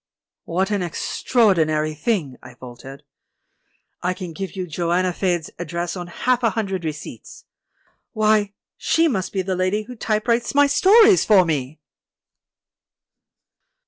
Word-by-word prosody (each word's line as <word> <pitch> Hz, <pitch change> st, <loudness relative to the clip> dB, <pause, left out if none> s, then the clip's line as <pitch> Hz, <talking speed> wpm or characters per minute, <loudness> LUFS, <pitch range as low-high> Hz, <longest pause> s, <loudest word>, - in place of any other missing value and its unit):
"What 190 Hz, +4 st, -1 dB
an 205 Hz, -2 st, 0 dB
extraordinary 165 Hz, -4 st, +1 dB
thing!" 155 Hz, -, -2 dB
I 125 Hz, -, -13 dB
faltered. 130 Hz, +2 st, -12 dB, 1.0 s
"I 180 Hz, +1 st, -1 dB
can 180 Hz, -4 st, -7 dB
give 195 Hz, +2 st, -6 dB
you 185 Hz, -1 st, -3 dB
'Joanna 175 Hz, +2 st, -1 dB
Faed's' 175 Hz, -3 st, -2 dB
address 170 Hz, +1 st, -4 dB
on 175 Hz, -1 st, -6 dB
half 250 Hz, +8 st, 0 dB
a 230 Hz, -, +3 dB
hundred 195 Hz, -5 st, -3 dB
receipts. 155 Hz, -2 st, -8 dB, 0.7 s
Why, 215 Hz, -2 st, +2 dB, 0.2 s
she 330 Hz, 0 st, +2 dB
must 195 Hz, -, -2 dB
be 190 Hz, -2 st, -2 dB
the 190 Hz, 0 st, -2 dB
lady 185 Hz, +4 st, 0 dB
who 250 Hz, +3 st, -10 dB
typewrites 230 Hz, +3 st, -1 dB
my 285 Hz, 0 st, +6 dB
stories 390 Hz, +8 st, +5 dB
for 195 Hz, -4 st, +5 dB
me!" 150 Hz, -2 st, -3 dB
185 Hz, 130 wpm, -21 LUFS, 165-215 Hz, 1.0 s, my